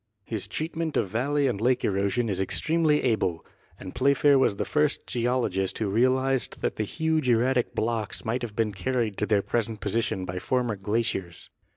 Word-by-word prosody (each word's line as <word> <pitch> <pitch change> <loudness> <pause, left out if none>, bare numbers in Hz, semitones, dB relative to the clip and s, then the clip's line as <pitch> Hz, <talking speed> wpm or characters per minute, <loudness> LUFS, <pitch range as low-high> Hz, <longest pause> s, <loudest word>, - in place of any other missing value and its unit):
His 110 -4 -3
treatment 160 0 -3
of 95 - 0
valley 140 +7 0
and 120 -6 -1
lake 125 +1 +2
erosion 100 +4 0
is 95 -3 -1
extremely 155 - +1
able. 100 -9 0 0.3
And 95 - -8
Playfair 140 0 +4
was 110 - +2
the - - -2
first 150 -1 0
geologist 115 -6 -1
who 105 -3 -1
realized 130 +3 +1
that - - -1
the 110 - 0
huge 160 +3 0
erratic 125 +2 +2
blocks 110 -2 -2
might 115 +3 -1
have 115 -4 -5
been 110 -2 +1
carried 115 +1 -1
to 105 - -1
their 100 -2 +2
present 115 -2 -2
position 100 -2 -1
by 90 0 -4
former 125 0 0
glaciers. 100 -3 -3
115 Hz, 175 wpm, -26 LUFS, 100-130 Hz, 0.3 s, Playfair